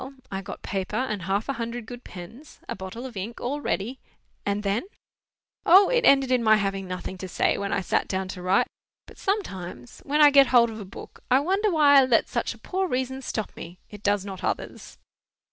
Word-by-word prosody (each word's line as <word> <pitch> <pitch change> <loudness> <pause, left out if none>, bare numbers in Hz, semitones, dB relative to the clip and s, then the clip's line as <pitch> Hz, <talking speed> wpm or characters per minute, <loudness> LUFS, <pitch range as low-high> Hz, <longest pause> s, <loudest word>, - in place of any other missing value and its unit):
I 195 0 -3
got 195 -1 -9
paper 190 -1 -3
and 230 -6 -1
half 195 +5 -1
a 275 - -1
hundred 235 -1 -5
good 245 +1 -9
pens, 225 - -11
a 235 - -4
bottle 195 +6 -7
of 250 -4 -8
ink, 205 +5 -5
all 285 +4 -3
ready—" 240 +1 -2 0.5
"And 200 +1 0
then—" 200 +3 0 0.8
"O, 380 +3 +7
it - - +2
ended 270 -2 +5
in 250 -2 +3
my 215 -1 +6
having 195 -2 -2
nothing 185 +1 -6
to 190 - -5
say, - - +1
when 200 0 -3
I 195 - +1
sat - - 0
down 190 0 -2
to 185 -1 -7
write. 185 +2 +3 0.4
But - - -16
sometimes, 190 - -4
when 295 +2 0
I 295 -1 +8
get 275 -1 +7
hold 235 -2 +5
of 220 - -8
a 205 - -7
book, 190 - -11
I 255 +1 +5
wonder 390 +8 +1
why 295 -5 +6
I - - +3
let 240 -3 +3
such - - -2
a - - -17
poor 380 0 -2
reason 260 -2 -2
stop 215 -5 -4
me. 175 +2 -9
It 210 -1 -10
does 205 -1 +1
not 190 -1 -7
others." - - -4
225 Hz, 215 wpm, -25 LUFS, 195-270 Hz, 0.8 s, I